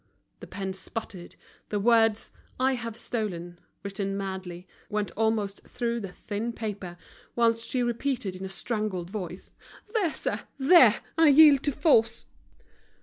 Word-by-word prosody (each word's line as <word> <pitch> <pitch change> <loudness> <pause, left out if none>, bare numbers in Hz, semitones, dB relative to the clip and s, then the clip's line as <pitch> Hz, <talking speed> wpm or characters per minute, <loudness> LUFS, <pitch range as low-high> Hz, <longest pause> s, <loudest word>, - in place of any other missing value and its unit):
The - - -10
pen 195 -1 -4
sputtered, 190 -1 -8 0.3
the 205 - -1
words: 225 0 +3 0.3
"I 265 +1 +3
have 230 -3 -5
stolen," 175 -8 -4 0.2
written 195 0 -3
madly, 190 -2 -6 0.2
went 210 -1 -2
almost 215 -2 -1
through 235 -1 -3
the 195 -4 -6
thin 220 +5 -4
paper, 205 -6 -6 0.4
whilst 230 -1 +2
she 250 -1 0
repeated 240 -4 -2
in 185 - -8
a 190 - -4
strangled 190 -3 -2
voice: 185 -3 -6 0.4
"There, 395 -8 +1
sir, - - -2 0.2
there. 265 - +6 0.2
I 325 - +7
yield 290 -1 +8
to 290 - +2
force." 275 -6 +3
215 Hz, 140 wpm, -27 LUFS, 195-240 Hz, 0.4 s, yield